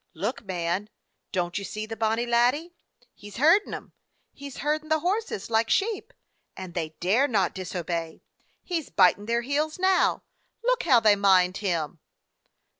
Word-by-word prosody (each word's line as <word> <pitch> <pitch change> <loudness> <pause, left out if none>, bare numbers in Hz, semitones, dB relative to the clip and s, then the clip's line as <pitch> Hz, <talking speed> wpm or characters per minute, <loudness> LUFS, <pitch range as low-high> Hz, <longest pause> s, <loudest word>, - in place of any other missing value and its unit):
Look, 205 +11 -3
man, 185 +1 -2 0.4
don't 180 -1 -1
you - - -7
see 215 +2 -5
the 225 +1 -6
bonny 225 +1 0
laddie? 245 +8 +1 0.4
He 205 - -12
's 205 - -13
herdin' 330 - +4
them! - - -8 0.4
He 280 0 -9
's 270 - -11
herdin' 305 +1 -2
the 315 -1 +2
horses 365 - -2
like 225 0 +2
sheep, 420 0 0 0.5
and 185 -2 -7
they 160 -3 -4
dare 220 +11 +3
not 200 -8 +1
disobey. 170 -3 -4 0.4
He 345 -3 -2
's - - -15
bitin' 195 +2 +3
their 235 0 +1
heels 295 +4 -1
now. 375 0 +2 0.4
Look - - +2
how 255 -7 +5
they 215 -2 +5
mind 190 -2 +3
him!" 170 -5 -2
220 Hz, 165 wpm, -26 LUFS, 185-300 Hz, 0.5 s, how